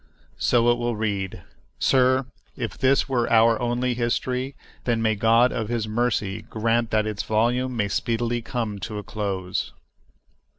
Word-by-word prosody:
So 120 Hz, -1 st, +3 dB
it 120 Hz, -, 0 dB
will 120 Hz, -1 st, -1 dB
read. 100 Hz, -4 st, -3 dB, 0.3 s
Sir, 130 Hz, 0 st, +3 dB, 0.3 s
if 115 Hz, -3 st, -4 dB
this 135 Hz, +1 st, +2 dB
were 125 Hz, -3 st, 0 dB
our 115 Hz, 0 st, +5 dB
only 120 Hz, +1 st, 0 dB
history, 125 Hz, +2 st, -1 dB, 0.3 s
then 120 Hz, -2 st, +1 dB
may 110 Hz, -1 st, +2 dB
God 115 Hz, +3 st, +4 dB
of 110 Hz, -1 st, -3 dB
His 115 Hz, -2 st, -1 dB
mercy 110 Hz, -3 st, -1 dB
grant 115 Hz, +1 st, 0 dB
that 110 Hz, -1 st, +1 dB
its 105 Hz, -1 st, -2 dB
volume 120 Hz, +3 st, 0 dB
may 105 Hz, -2 st, +1 dB
speedily 120 Hz, +3 st, -1 dB
come 115 Hz, -3 st, -3 dB
to 105 Hz, +2 st, -5 dB
a 105 Hz, -, -5 dB
close. 95 Hz, -3 st, -3 dB
115 Hz, 155 wpm, -24 LUFS, 110-120 Hz, 0.3 s, our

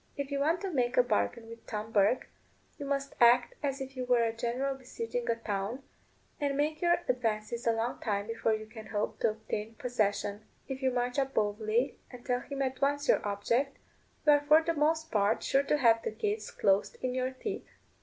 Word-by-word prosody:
If 280 Hz, 0 st, -4 dB
you 280 Hz, -, 0 dB
want 320 Hz, +5 st, +2 dB
to 390 Hz, -2 st, -3 dB
make 250 Hz, -4 st, 0 dB
a 250 Hz, -, +7 dB
bargain 225 Hz, -, 0 dB
with 230 Hz, 0 st, -12 dB
Tom 215 Hz, 0 st, -4 dB
Bourke 205 Hz, +3 st, +3 dB, 0.5 s
you 285 Hz, -, -5 dB
must 275 Hz, 0 st, -1 dB
act 240 Hz, +1 st, +6 dB
as 275 Hz, -1 st, -1 dB
if 270 Hz, 0 st, -6 dB
you 255 Hz, -, -3 dB
were 245 Hz, -1 st, +3 dB
a 225 Hz, -1 st, 0 dB
general 245 Hz, +4 st, -1 dB
besieging 460 Hz, -, -5 dB
a -, -, +3 dB
town, 220 Hz, +3 st, -3 dB, 0.6 s
and 285 Hz, -2 st, 0 dB
make 305 Hz, +2 st, 0 dB
your 345 Hz, 0 st, +3 dB
advances 235 Hz, -1 st, -1 dB
a -, -, +6 dB
long 225 Hz, +2 st, -2 dB
time 200 Hz, -2 st, -1 dB
before 225 Hz, 0 st, 0 dB
you 215 Hz, 0 st, -6 dB
can 220 Hz, 0 st, -11 dB
hope 210 Hz, 0 st, -2 dB
to -, -, +3 dB
obtain 215 Hz, 0 st, -5 dB
possession; 210 Hz, -4 st, -1 dB, 0.2 s
if 270 Hz, 0 st, -5 dB
you 265 Hz, -, +3 dB
march 245 Hz, +1 st, 0 dB
up 270 Hz, 0 st, -1 dB
boldly, 215 Hz, +4 st, 0 dB
and 250 Hz, -1 st, -12 dB
tell 245 Hz, -1 st, +1 dB
him 275 Hz, +1 st, -3 dB
at 260 Hz, -1 st, -3 dB
once 285 Hz, +1 st, +1 dB
your -, -, +4 dB
object, 230 Hz, +7 st, 0 dB, 0.5 s
you 300 Hz, -, +7 dB
are 290 Hz, 0 st, +5 dB
for 305 Hz, +2 st, +5 dB
the 335 Hz, +1 st, 0 dB
most 315 Hz, +1 st, +1 dB
part 205 Hz, +1 st, +2 dB
sure 270 Hz, -, +3 dB
to 290 Hz, +1 st, +1 dB
have 230 Hz, -4 st, +4 dB
the -, -, -2 dB
gates 215 Hz, 0 st, -2 dB
closed 195 Hz, 0 st, +1 dB
in 255 Hz, -1 st, 0 dB
your 255 Hz, 0 st, 0 dB
teeth. 390 Hz, +11 st, -5 dB
245 Hz, 210 wpm, -31 LUFS, 220-275 Hz, 0.6 s, a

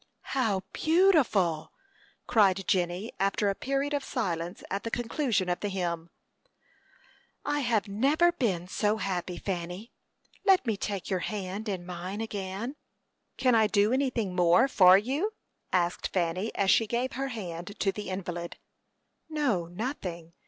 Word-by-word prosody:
"How 220 Hz, -8 st, +1 dB
beautiful!" 275 Hz, -, +3 dB, 0.5 s
cried 195 Hz, -4 st, +3 dB
Jenny, 180 Hz, +3 st, 0 dB
after 195 Hz, +1 st, +1 dB
a -, -, +1 dB
period 275 Hz, +6 st, -1 dB
of 285 Hz, -1 st, 0 dB
silence 175 Hz, -, -3 dB
at 195 Hz, +1 st, -1 dB
the 230 Hz, -, -4 dB
conclusion 235 Hz, -, 0 dB
of 175 Hz, 0 st, 0 dB
the 205 Hz, -, -2 dB
hymn. 170 Hz, -3 st, -3 dB, 1.4 s
"I 290 Hz, -, 0 dB
have 230 Hz, -6 st, +1 dB
never 280 Hz, +12 st, +3 dB
been 195 Hz, -, -1 dB
so 210 Hz, +3 st, +1 dB
happy, 180 Hz, -3 st, -3 dB
Fanny. 180 Hz, +4 st, -4 dB, 0.5 s
Let 385 Hz, -5 st, +5 dB
me 225 Hz, -3 st, +1 dB
take 200 Hz, -1 st, -4 dB
your 185 Hz, -, +1 dB
hand 200 Hz, +3 st, -4 dB
in 185 Hz, -3 st, -3 dB
mine 180 Hz, +3 st, -5 dB
again." 210 Hz, +4 st, -4 dB, 0.6 s
"Can 255 Hz, -2 st, +3 dB
I 220 Hz, -2 st, +5 dB
do 210 Hz, +2 st, +3 dB
anything 240 Hz, -8 st, 0 dB
more 175 Hz, +6 st, +5 dB
for 185 Hz, -7 st, +7 dB
you?" 280 Hz, -, -1 dB, 0.4 s
asked 175 Hz, -1 st, +1 dB
Fanny, 185 Hz, +4 st, -1 dB
as 195 Hz, -1 st, +3 dB
she 225 Hz, -, +4 dB
gave 240 Hz, +4 st, -1 dB
her 270 Hz, +1 st, -3 dB
hand 195 Hz, -5 st, -6 dB
to 195 Hz, -, +2 dB
the 205 Hz, -1 st, -6 dB
invalid. 175 Hz, -2 st, -5 dB, 0.7 s
"No, 255 Hz, -, 0 dB
nothing. 175 Hz, -, -5 dB
200 Hz, 145 wpm, -29 LUFS, 180-245 Hz, 1.4 s, for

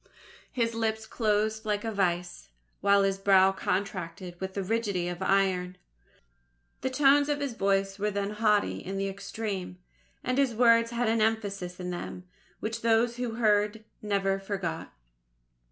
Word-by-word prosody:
His 230 Hz, -2 st, 0 dB
lips 220 Hz, -1 st, -1 dB
closed 215 Hz, 0 st, 0 dB
like 210 Hz, -2 st, -1 dB
a 225 Hz, -, -2 dB
vice, 180 Hz, -, -1 dB, 0.3 s
while 200 Hz, 0 st, +4 dB
his 195 Hz, 0 st, 0 dB
brow 195 Hz, -1 st, +5 dB
contracted 185 Hz, -2 st, -3 dB
with 190 Hz, 0 st, -4 dB
the 200 Hz, -, -1 dB
rigidity 200 Hz, -4 st, -1 dB
of 175 Hz, +1 st, -5 dB
iron. 190 Hz, -2 st, +1 dB, 1.0 s
The 260 Hz, -, -1 dB
tones 285 Hz, +2 st, +4 dB
of 290 Hz, 0 st, 0 dB
his 280 Hz, -4 st, -2 dB
voice 195 Hz, -1 st, 0 dB
were 210 Hz, +1 st, +1 dB
then 200 Hz, 0 st, -2 dB
haughty 210 Hz, -1 st, +1 dB
in 195 Hz, +1 st, -5 dB
the 195 Hz, 0 st, -1 dB
extreme, 195 Hz, -1 st, -5 dB, 0.5 s
and 255 Hz, +2 st, 0 dB
his 265 Hz, -5 st, +2 dB
words 230 Hz, 0 st, +5 dB
had 235 Hz, 0 st, -1 dB
an 225 Hz, 0 st, +2 dB
emphasis 200 Hz, -5 st, -1 dB
in 180 Hz, 0 st, -4 dB
them, 180 Hz, +1 st, -6 dB, 0.4 s
which 225 Hz, +1 st, -3 dB
those 230 Hz, +1 st, +2 dB
who 245 Hz, -2 st, -3 dB
heard 210 Hz, -1 st, +2 dB, 0.2 s
never 195 Hz, -2 st, 0 dB
forgot. 190 Hz, -5 st, -4 dB
205 Hz, 155 wpm, -28 LUFS, 195-225 Hz, 1.0 s, brow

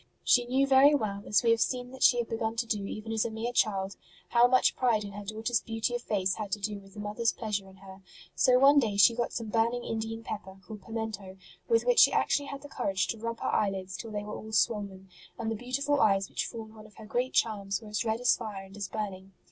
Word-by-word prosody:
She 245 Hz, -1 st, +4 dB
knew 265 Hz, +2 st, +2 dB
very 275 Hz, +2 st, +6 dB
well, 200 Hz, -6 st, -2 dB
as 210 Hz, -, +3 dB
we 230 Hz, -, +4 dB
have 230 Hz, -1 st, +2 dB
seen 250 Hz, -1 st, -1 dB
that 265 Hz, -, -12 dB
she 245 Hz, -, +6 dB
had 240 Hz, -1 st, -1 dB
begun 225 Hz, 0 st, -2 dB
to 230 Hz, +1 st, -1 dB
do 210 Hz, -3 st, -2 dB
even 215 Hz, +2 st, -6 dB
as 220 Hz, -1 st, +1 dB
a 235 Hz, -, -2 dB
mere 225 Hz, +2 st, -4 dB
child, 195 Hz, -4 st, 0 dB, 0.3 s
how 240 Hz, 0 st, +5 dB
much 255 Hz, 0 st, +3 dB
pride 235 Hz, -5 st, +1 dB
in 200 Hz, -, -7 dB
her 205 Hz, +1 st, -8 dB
daughter 220 Hz, +3 st, -4 dB
s -, -, +3 dB
beauty 225 Hz, +1 st, -2 dB
of 240 Hz, -, -2 dB
face 190 Hz, -5 st, 0 dB
had 210 Hz, -2 st, -5 dB
to 210 Hz, -, -1 dB
do 205 Hz, 0 st, -3 dB
with 195 Hz, -1 st, -18 dB
the -, -, -8 dB
mother 210 Hz, +2 st, -5 dB
s 230 Hz, -, +4 dB
pleasure 205 Hz, -4 st, -4 dB
in 190 Hz, -, -16 dB
her; 190 Hz, 0 st, -13 dB, 0.3 s
so 250 Hz, -1 st, +4 dB
one 280 Hz, +2 st, +6 dB
day 215 Hz, -6 st, -1 dB
she 200 Hz, +4 st, +7 dB
got 240 Hz, 0 st, -2 dB
some 230 Hz, -2 st, -5 dB
burning 230 Hz, +2 st, +1 dB
Indian 225 Hz, 0 st, -4 dB
pepper, 190 Hz, -3 st, -7 dB
called 215 Hz, -2 st, -9 dB
pimento, 215 Hz, -3 st, -6 dB, 0.3 s
with 460 Hz, -1 st, +2 dB
which -, -, +4 dB
she -, -, +8 dB
actually 285 Hz, -1 st, +1 dB
had 280 Hz, 0 st, -7 dB
the -, -, -8 dB
courage 195 Hz, -8 st, -1 dB
to 225 Hz, -, -3 dB
rub 230 Hz, +1 st, -5 dB
her -, -, -1 dB
eyelids 190 Hz, -2 st, -1 dB
till 225 Hz, -, -7 dB
they 210 Hz, -1 st, -4 dB
\vere 210 Hz, -, -8 dB
all 220 Hz, -, -8 dB
swollen, 200 Hz, -3 st, 0 dB, 0.3 s
and 225 Hz, -1 st, -3 dB
the -, -, -1 dB
beautiful 275 Hz, +5 st, -1 dB
eyes 195 Hz, -2 st, +3 dB
which -, -, -2 dB
formed 220 Hz, -2 st, -8 dB
one 215 Hz, -1 st, -13 dB
of 210 Hz, -, -22 dB
her 220 Hz, -, -11 dB
great 245 Hz, +4 st, -2 dB
charms 200 Hz, -4 st, 0 dB
were 215 Hz, -, -12 dB
as 210 Hz, +2 st, -1 dB
red 220 Hz, 0 st, -1 dB
as 245 Hz, 0 st, +4 dB
fire 210 Hz, -4 st, -6 dB
and 195 Hz, +1 st, -14 dB
as 200 Hz, -2 st, -4 dB
burning. 195 Hz, -3 st, -6 dB
220 Hz, 260 wpm, -29 LUFS, 200-240 Hz, 0.3 s, she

